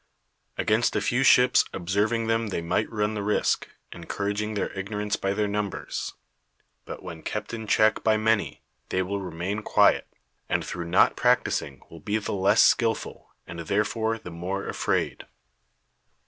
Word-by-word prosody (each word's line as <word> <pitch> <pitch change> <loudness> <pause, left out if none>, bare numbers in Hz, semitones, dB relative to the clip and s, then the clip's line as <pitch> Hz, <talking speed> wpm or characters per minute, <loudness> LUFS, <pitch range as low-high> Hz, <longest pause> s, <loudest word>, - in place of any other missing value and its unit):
Against - - +1
a - - +3
few 120 +2 0
ships 125 -1 +6
observing 105 +6 0
them 115 0 0
they 90 -4 -3
might 95 +6 0
run 105 -1 0
the 105 - -3
risk, 105 +1 0 0.2
encouraging 100 +5 -3
their 100 - -2
ignorance 105 +1 -2
by 95 - -2
their 105 +1 0
numbers; 100 -1 -3 0.7
but - - -8
when 80 -1 -8
kept 105 +1 -5
in 110 -2 -5
check 110 +1 +3
by 110 -1 +3
many, 110 -1 0 0.3
they 95 - 0
will 100 +2 -3
remain 90 +3 -4
quiet; - - +3 0.4
and - - 0
through 85 -1 -5
not 85 - +4
practising 70 -2 +1
will 85 - -10
be 105 +7 -1
the 110 - -4
less 100 +2 +4
skilful, 115 -2 +1 0.2
and 85 - -8
therefore 105 +5 0
the 90 - -10
more 90 +4 -4
afraid. - - -1
105 Hz, 155 wpm, -26 LUFS, 95-110 Hz, 0.7 s, ships